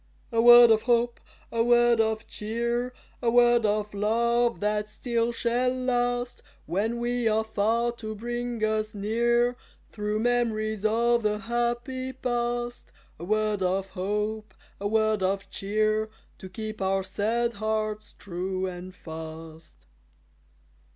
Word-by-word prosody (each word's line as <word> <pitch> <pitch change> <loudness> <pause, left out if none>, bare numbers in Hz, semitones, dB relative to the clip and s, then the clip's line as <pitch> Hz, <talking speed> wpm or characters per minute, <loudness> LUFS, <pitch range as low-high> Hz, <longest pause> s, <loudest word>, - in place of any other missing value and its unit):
A 230 -1 +2
word 240 0 +9
of 220 -1 +4
hope, 240 0 +2 0.3
a 230 0 +1
word 240 -1 +4
of 220 0 -1
cheer, 235 +3 -2 0.3
A 240 - +2
word 240 -1 +4
of 210 0 -1
love, 235 +3 +1
that 210 0 -1
still 235 +1 -1
shall 240 +2 0
last, 245 -1 -1 0.2
When 220 +6 -1
we 240 0 0
are 220 0 +2
far 225 +2 0
to 215 -1 -6
bring 240 +1 -4
us 215 0 0
near 235 +4 +1 0.4
Through 210 0 -2
memories 220 -3 0
of 235 +2 +2
the 210 -1 0
happy 240 +3 -2
past; 240 -1 -3 0.3
A - - -8
word 215 +1 0
of 190 +1 0
hope, 210 +3 -3 0.2
a 200 - -2
word 215 -1 +1
of 195 +1 -1
cheer, 215 +2 0 0.3
To 190 - -9
keep 215 +2 -6
our 190 0 +1
sad 225 +5 -1
hearts 215 -1 -2
true 185 0 -3
and 185 0 -7
fast. 160 -1 -10
220 Hz, 130 wpm, -27 LUFS, 210-240 Hz, 0.4 s, word